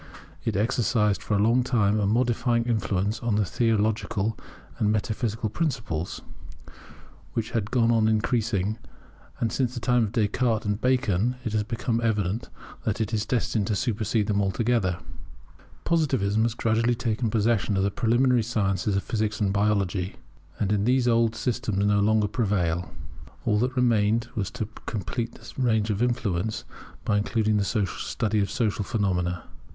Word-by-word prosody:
It - - -1
exercised 105 -1 +1
for 105 - -1
a - - +2
long 120 +3 +4
time 110 -4 +2
a 100 - +1
modifying 120 +1 +2
influence 105 -2 0
upon 115 -4 0
theological 110 -1 0 0.4
and 105 -1 +2
metaphysical 110 +1 -1
principles, 110 - -3 1.1
which 110 -1 -2
has 110 -3 0
gone 115 +1 +2
on 110 -2 +3
increasing; 110 -2 0 0.6
and 115 - 0
since 125 -1 -1
the - - -3
time 120 -1 +2
of 100 - -5
Descartes 110 +1 +1
and 105 +1 -1
Bacon 125 -3 +1
it 110 - -2
has 110 - +2
become 115 +2 -2
evident 105 -1 -1 0.3
that 110 -1 -1
it 110 0 -2
is 105 0 -1
destined 115 -4 0
to 105 - 0
supersede 110 0 0
them 100 0 +1
altogether. 100 -2 +1 0.9
Positivism 130 -11 +1
has 115 0 -1
gradually 115 +1 +1
taken 115 -1 -1
possession 110 -2 +1
of 95 - +2
the 100 - +1
preliminary 120 +2 +3
sciences 100 -3 0
of 95 - 0
Physics 110 -1 -1
and 100 -3 +1
Biology, 100 -2 0 0.4
and 100 -1 0
in 105 -1 +1
these 125 +1 +3
the 120 - +4
old 115 -1 +2
system 120 -4 -2
no 100 +1 +3
longer 105 +1 +3
prevails. 95 -6 0 0.6
All 105 - +2
that 125 +3 0
remained 115 -2 +2
was 105 -7 -2
to 110 - -4 0.2
complete 115 +3 -3
the - - -8
range 110 -3 +2
of 105 +1 -2
its 125 - +4
influence 110 -3 -2 0.4
by 105 -2 +2
including 110 0 +1
the 100 +1 +1
study 105 +3 -2
of 100 - 0
social 110 -3 0
phenomena. 90 -4 -1
110 Hz, 160 wpm, -26 LUFS, 100-120 Hz, 1.1 s, long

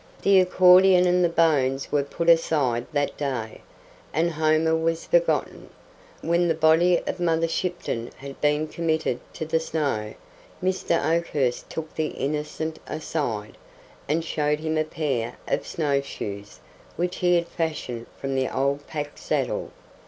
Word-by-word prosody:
The 195 -1 +6
accordion 180 0 +6
and 180 0 +3
the 175 - +3
bones 140 -5 +1
were 145 - +3
put 165 +4 -4
aside 145 -8 +3
that 145 -1 -1
day, 130 -6 -4 0.5
and 170 +2 +1
Homer 155 +1 +2
was 165 0 -1
forgotten. - - 0 0.5
When 170 +1 +2
the 165 - +1
body 160 +3 +4
of - - -3
Mother 165 -1 +1
Shipton 165 -9 -3
had 135 0 -10
been 150 +1 +2
committed 160 -6 -1 0.2
to 160 - -4
the 160 +1 +1
snow, 140 -10 -2 0.4
Mr. 185 -2 0 0.2
Oakhurst 140 -7 -1
took 160 -1 -6
the 155 -1 -1
Innocent 150 +3 -3
aside, 140 -9 -4 0.5
and 160 +2 0
showed 150 -1 0
him 160 0 -1
a 155 0 +1
pair 140 -7 -2
of - - -1
snowshoes, 140 -9 -3 0.3
which 180 +1 -2
he 180 0 +3
had 170 0 +1
fashioned 155 -9 -4
from 135 0 -3
the 130 -1 0
old 140 +2 -1
pack 145 -2 -5
saddle. - - -1
155 Hz, 145 wpm, -25 LUFS, 140-170 Hz, 0.5 s, The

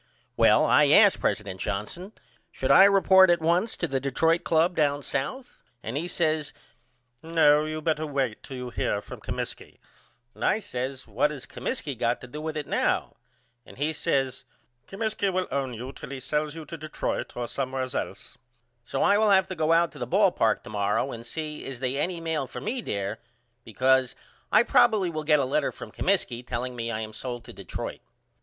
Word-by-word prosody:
Well - - +5
I - - +5
asked - - +6
president 100 -3 -2
Johnson 175 - -4 0.4
should - - -1
I 190 - +9
report 190 -1 +6
at 175 0 +4
once 170 +7 +1
to 175 - -1
the 135 -3 -1
Detroit 160 +5 +1
Club 165 +2 +2
down 145 -2 +1
south 245 - -4 0.2
and 115 - -5
he 160 +5 -2
says 155 -4 0 0.7
No 155 -2 +4
you 155 0 -4
better 155 -1 0
wait 135 -6 -2
till 130 - -8
you 125 0 -5
hear 105 - -1
from - - -10
Comiskey - - -6 0.6
and - - -9
I - - +3
says 130 - -5
What 115 +7 +1
has 145 -4 -7
Comiskey 195 - -4
got 120 +1 0
to 130 - -9
do 150 +5 -7
with 155 0 -4
it 150 - -3
now? - - 0 0.5
And - - -15
he 150 +3 -1
says 135 -3 -1 0.4
Comiskey 205 -1 -1
will 185 0 0
own 135 -3 -2
you 125 +4 -6
till 135 - -10
he 140 -1 -6
sells 150 +3 -2
you 160 -1 -8
to 165 0 -8
Detroit 155 -4 -4
or 120 -1 -2
somewheres 130 -1 -3
else. - - -5 0.4
So - - -2
I 205 - +4
will 215 -1 +3
have 190 -1 +4
to 185 - -4
go 160 -1 +1
out 170 0 +4
to - - -13
the 120 - -3
ball 195 - +4
park 110 -8 +1
to 120 - -10
morrow 105 +6 0
and 115 - -7
see 150 +5 -5
is 135 -3 -6
they 130 +1 -1
any 175 +3 -1
mail 160 -4 -2
for - - -7
me 250 +1 -3
there 100 - -3 0.4
because 130 +2 +2 0.4
I - - +6
probily 210 -7 +3
will 155 -1 -4
get 150 0 +5
a 135 - +1
letter 145 +2 0
from - - -10
Comiskey 175 -11 0
telling 125 +1 -4
me 115 -1 -3
I 110 -1 -3
am 110 0 -6
sold 120 +1 -6
to - - -11
Detroit. - - -6
145 Hz, 200 wpm, -26 LUFS, 125-170 Hz, 0.7 s, I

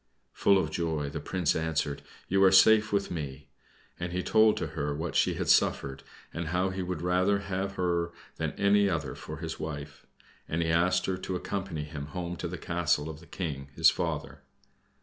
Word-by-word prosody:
Full 100 - +4
of 95 - 0
joy, 80 -4 -1
the - - -4
Prince 90 -4 0
answered, 80 -3 -1 0.3
"You 95 +1 +3
are 95 - +7
safe 105 +3 +6
with 100 -1 0
me." 70 -4 -6 0.5
And 85 0 -3
he 90 0 -1
told 110 -1 +4
to - - -2
her 70 0 -2
what 80 +2 -4
she - - +3
had - - -3
suffered, 70 -1 +2 0.3
and 85 -1 -3
how 90 +3 0
he 95 0 -3
would 90 -2 -4
rather 90 +3 +2
have 95 0 -3
her 85 -2 0 0.3
than - - -2
any 100 0 +3
other 75 -7 -2
for 75 - -8
his 80 +1 -5
wife, 75 -2 -7 0.4
and 85 +2 0
he 80 - -1
asked 90 +3 +2
her 95 -1 -1
to 95 0 -4
accompany 90 -4 -3
him 75 -1 -6
home 85 +3 -4
to 85 - -3
the 90 +1 -5
castle 80 -3 0
of 75 - -11
the 85 - -16
King 70 -6 -5
his - - +6
father. - - -3
85 Hz, 195 wpm, -29 LUFS, 75-95 Hz, 0.5 s, are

